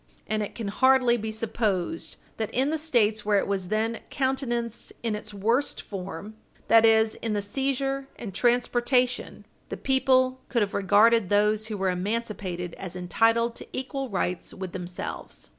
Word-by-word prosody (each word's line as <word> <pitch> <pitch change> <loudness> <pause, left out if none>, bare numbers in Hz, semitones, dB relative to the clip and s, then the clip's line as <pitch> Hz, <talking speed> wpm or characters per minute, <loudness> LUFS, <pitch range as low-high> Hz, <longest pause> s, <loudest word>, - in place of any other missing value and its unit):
And 215 0 -1
it 205 - -5
can 220 -4 -4
hardly 260 +2 +4
be 220 -1 -3
supposed 210 -6 -2 0.2
that, 220 -2 -2
in 265 +4 +2
the 320 - -1
States 220 -8 +2
where 205 -1 +3
it - - +1
was 195 -2 -2
then 220 +3 0
countenanced 245 -4 -2
in 225 -2 0
its 210 0 -6
worst 230 +7 0
form 195 +1 -7 0.4
that 225 0 +7
is, 220 0 +4
in 225 -2 -1
the 205 - +1
seizure 270 +5 -1
and 205 -5 -7
transportation 245 +2 +1 0.2
the - - -4
people 260 -1 +2
could 235 -4 +2
have 200 - -4
regarded 205 +1 +4
those 210 +1 +2
who 215 -2 -4
were 190 -1 +1
emancipated 185 -3 -3
as 185 -2 -7
entitled 225 +6 +2
to - - -7
equal 265 0 -3
rights 180 -3 -2
with 190 -2 -6
themselves. 175 - -6
220 Hz, 160 wpm, -26 LUFS, 200-245 Hz, 0.4 s, that